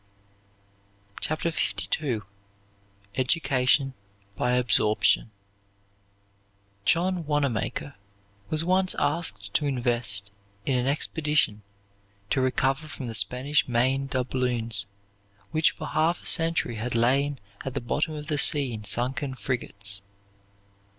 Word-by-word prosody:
CHAPTER 155 Hz, +2 st, 0 dB, 0.5 s
LII 125 Hz, -8 st, -2 dB, 0.9 s
EDUCATION 135 Hz, 0 st, +2 dB, 0.4 s
BY 125 Hz, -, 0 dB
ABSORPTION 115 Hz, -3 st, +2 dB, 1.6 s
John 175 Hz, -1 st, +1 dB
Wanamaker 145 Hz, -1 st, -1 dB, 0.6 s
was 155 Hz, +1 st, +2 dB
once 185 Hz, +1 st, +2 dB
asked 100 Hz, -, -1 dB
to 150 Hz, -, +1 dB
invest 120 Hz, -6 st, 0 dB, 0.3 s
in 130 Hz, -2 st, +1 dB
an 125 Hz, -, -1 dB
expedition 150 Hz, -6 st, +1 dB, 0.7 s
to 135 Hz, -, +2 dB
recover 135 Hz, +3 st, 0 dB
from 140 Hz, -, -7 dB
the -, -, -4 dB
Spanish 125 Hz, +8 st, +2 dB
Main 130 Hz, +3 st, +1 dB
doubloons 120 Hz, -5 st, 0 dB, 0.6 s
which 155 Hz, 0 st, +3 dB
for -, -, -8 dB
half 160 Hz, +3 st, 0 dB
a -, -, -14 dB
century 165 Hz, -8 st, +3 dB
had 120 Hz, +2 st, -3 dB
lain 135 Hz, +4 st, +2 dB, 0.2 s
at 135 Hz, 0 st, -5 dB
the -, -, 0 dB
bottom 155 Hz, +6 st, -2 dB
of 150 Hz, 0 st, -6 dB
the 150 Hz, -1 st, 0 dB
sea 140 Hz, -4 st, +4 dB
in 110 Hz, -1 st, -6 dB
sunken 125 Hz, +5 st, +1 dB
frigates. 100 Hz, -6 st, -2 dB
130 Hz, 110 wpm, -26 LUFS, 120-150 Hz, 1.6 s, sea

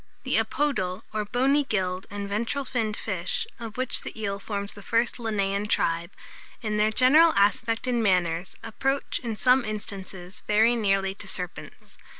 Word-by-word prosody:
The -, -, +2 dB
Apodal, 220 Hz, -9 st, -1 dB
or 215 Hz, -1 st, -1 dB
bony 265 Hz, +6 st, +2 dB
gilled 185 Hz, -6 st, -2 dB
and 205 Hz, 0 st, -5 dB
ventral 235 Hz, +7 st, -2 dB
finned 225 Hz, -4 st, -1 dB
fish, 460 Hz, -, -2 dB
of 225 Hz, -1 st, -7 dB
which 255 Hz, -1 st, 0 dB
the -, -, -8 dB
eel 200 Hz, -2 st, -2 dB
forms 200 Hz, -1 st, -4 dB
the 205 Hz, -, -11 dB
first 230 Hz, +5 st, 0 dB
Linnaean 205 Hz, -3 st, -1 dB
tribe, 170 Hz, -4 st, +1 dB, 0.5 s
in 210 Hz, -1 st, -1 dB
their 210 Hz, +1 st, +4 dB
general 300 Hz, +8 st, +6 dB
aspect 225 Hz, +4 st, +2 dB
and 245 Hz, -2 st, +1 dB
manners, 180 Hz, -3 st, +1 dB
approach, 270 Hz, +5 st, -1 dB
in 230 Hz, -3 st, -4 dB
some 255 Hz, +3 st, +4 dB
instances, 195 Hz, -3 st, -6 dB
very 220 Hz, +3 st, +4 dB
nearly 195 Hz, -3 st, +1 dB
to 200 Hz, -, -11 dB
serpents. 180 Hz, -2 st, -6 dB
215 Hz, 155 wpm, -26 LUFS, 195-240 Hz, 0.5 s, general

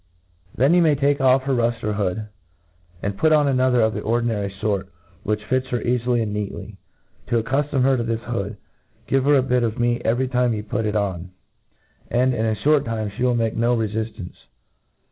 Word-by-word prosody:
Then 135 Hz, +7 st, +3 dB
you 175 Hz, -, +5 dB
may 155 Hz, -3 st, +4 dB
take 140 Hz, +1 st, +1 dB
off" 130 Hz, 0 st, +4 dB
her 135 Hz, 0 st, 0 dB
ruftcr 115 Hz, -3 st, 0 dB
hopd, 100 Hz, +1 st, -2 dB, 0.8 s
and 100 Hz, 0 st, -3 dB
put 155 Hz, -, +3 dB
on 150 Hz, -2 st, +4 dB
another 130 Hz, -2 st, +3 dB
of 110 Hz, 0 st, +2 dB
the -, -, -4 dB
ordinary 115 Hz, -3 st, 0 dB
fort, 100 Hz, -1 st, -2 dB, 0.3 s
which 105 Hz, 0 st, -2 dB
fits 130 Hz, +2 st, 0 dB
her 125 Hz, -, -1 dB
eafily 120 Hz, 0 st, 0 dB
and 105 Hz, -2 st, -4 dB
neatly. 105 Hz, -1 st, -5 dB, 0.5 s
To 115 Hz, -2 st, +1 dB
accuftom 135 Hz, +2 st, 0 dB
her 135 Hz, 0 st, +4 dB
to 120 Hz, -, -1 dB
this 115 Hz, 0 st, -2 dB
hood, 110 Hz, -3 st, -4 dB, 0.5 s
give 135 Hz, -1 st, +1 dB
her 145 Hz, 0 st, +5 dB
a 135 Hz, -, +3 dB
bit 125 Hz, -1 st, +1 dB
of 115 Hz, -2 st, -1 dB
meat 120 Hz, 0 st, +1 dB
<;very 120 Hz, +4 st, 0 dB
time 125 Hz, -2 st, +1 dB
you 105 Hz, -, -4 dB
put 110 Hz, +1 st, -2 dB
it 105 Hz, -, -2 dB
on, 95 Hz, -4 st, -2 dB, 0.8 s
and,.in 125 Hz, +1 st, +2 dB, 0.2 s
aihort 145 Hz, +5 st, +2 dB
time, 110 Hz, -4 st, -3 dB
fl^e 100 Hz, -, -14 dB
will 125 Hz, -1 st, +2 dB
make 115 Hz, -2 st, 0 dB
no 120 Hz, +1 st, +2 dB
refiftance. 110 Hz, -4 st, -4 dB
120 Hz, 190 wpm, -22 LUFS, 105-130 Hz, 0.8 s, you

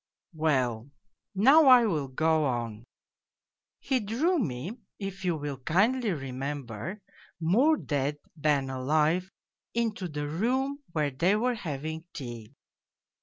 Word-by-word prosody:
Well, 130 Hz, -6 st, 0 dB, 0.5 s
now 275 Hz, +10 st, +6 dB
I 250 Hz, -2 st, +8 dB
will 155 Hz, -10 st, 0 dB
go 155 Hz, +3 st, +2 dB
on: 120 Hz, -3 st, -3 dB, 0.9 s
he 265 Hz, -2 st, 0 dB
drew 265 Hz, -, +1 dB
me, 175 Hz, -, -3 dB, 0.2 s
if 195 Hz, -1 st, -6 dB
you 175 Hz, -2 st, +1 dB
will 145 Hz, -3 st, -5 dB
kindly 215 Hz, -, +2 dB
remember, 135 Hz, -, -5 dB, 0.4 s
more 240 Hz, -, +4 dB
dead 145 Hz, -, -1 dB, 0.2 s
than 145 Hz, -4 st, +1 dB
alive 155 Hz, +7 st, +1 dB, 0.5 s
into 225 Hz, -5 st, -1 dB
the 150 Hz, -2 st, -4 dB
room 260 Hz, -, 0 dB
where 150 Hz, -3 st, 0 dB
they 170 Hz, +9 st, +2 dB
were 245 Hz, +4 st, +1 dB
having 160 Hz, -, -5 dB
tea. 120 Hz, -2 st, -8 dB
160 Hz, 120 wpm, -28 LUFS, 135-215 Hz, 0.9 s, I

